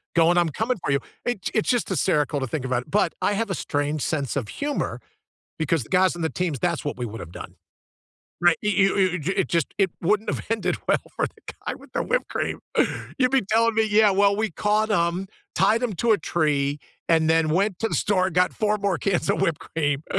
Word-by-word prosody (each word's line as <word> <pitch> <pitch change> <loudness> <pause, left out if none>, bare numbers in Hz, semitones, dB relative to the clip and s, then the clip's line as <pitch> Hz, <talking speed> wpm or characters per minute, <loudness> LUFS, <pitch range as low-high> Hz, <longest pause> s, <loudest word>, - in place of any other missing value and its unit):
going, 170 +1 +4
"I'm 170 -2 +3
coming 225 - -1
for - - 0
you." 140 - +3 0.3
It 240 -6 -2
it's 220 - +1
just 245 -3 +1
hysterical 150 -5 +1
to 135 - -1
think 130 +1 -4
about 125 -1 0
it, - - -19
but 195 -4 +2
I - - +2
have 225 +1 -1
a 190 - -1
strange 145 -1 -2
sense 145 -4 -1
of 125 -7 -2
humor 285 0 -3 0.6
because 160 -4 0
the - - -17
guys 185 0 +3
on 175 - -8
the 160 - +1
teams, 175 -6 -2
that's 170 +3 -1
what 145 - -3
we 120 - -2
would 115 0 -7
have 85 - -9
done. 90 - -9 0.9
Right? 175 -1 +5
You 210 - +1
you 195 0 +3
you 185 -2 +2
it 150 - -4
it 190 - +1
just 170 -4 0
it 195 -2 +2
wouldn't 210 +5 +1
have - - -4
ended 225 -1 0
well - - +4 0.2
for - - +1
the - - -11
guy - - -1
with - - -16
the - - 0
whipped - - -1
cream. - - -3 0.6
You'd 255 -1 +3
be 270 -2 +3
telling 230 0 +3
me, 220 0 +3
"Yeah, 210 0 +5
well, 200 +1 +3
we 220 -1 0
caught 210 +5 +1
'em, 175 0 0 0.3
tied 225 +3 +3
'em 235 -5 -1
to 225 +6 +2
a 205 - +3
tree, 145 -3 0 0.3
and 160 -1 +3
then 160 -1 +3
went 190 +3 +1
to 225 - +1
the - - -3
store, 185 -2 +2
got 180 0 +2
4 210 -1 +1
more 200 -3 -1
cans 195 -3 0
of - - 0
whipped 165 -3 0
cream, 145 -2 -2
180 Hz, 235 wpm, -24 LUFS, 155-210 Hz, 0.9 s, Right